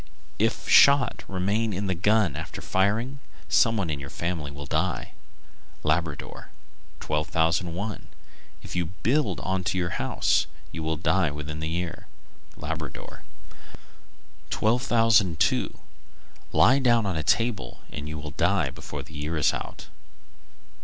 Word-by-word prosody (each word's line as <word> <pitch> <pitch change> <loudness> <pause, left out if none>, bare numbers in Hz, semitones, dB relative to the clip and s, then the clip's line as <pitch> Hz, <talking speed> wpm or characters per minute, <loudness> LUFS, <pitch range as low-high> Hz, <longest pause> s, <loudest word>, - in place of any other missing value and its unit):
If - - 0
shot 140 -4 +6
remain 100 +4 0
in 100 +2 -2
the 95 - +1
gun 100 -3 +2
after 80 +1 -6
firing, 110 +8 0 0.3
some 115 -1 +4
one 90 -7 -1
of 75 - -3
your 70 -1 -7
family 85 -3 -3
will 70 +1 -8
die. - - -1 0.7
Labrador. 75 -1 -2 0.5
1201. 80 +6 -1 0.6
If - - -8
you 85 -2 0 0.2
build 145 +6 +1
on 95 0 -1
to 95 - 0
your 85 -1 -1
house, - - +2 0.2
you 80 - -5
will 80 0 -1
die 85 +1 +2
within 75 +1 -6
the 80 0 -3
year. 85 0 -4 0.5
Labrador. 75 0 -6 1.3
1202. 115 -6 +2 0.7
Lie 105 - +5
down 120 -4 +3
on 95 -3 -1
a 80 - 0
table 115 +7 0
and 75 0 -6
you 75 - -5
will 75 -1 -6
die 85 -3 +1
before 70 +1 -7
the 80 +2 -15
year 75 +2 -3
is 75 - +3
out. - - -6
85 Hz, 130 wpm, -26 LUFS, 75-105 Hz, 1.3 s, shot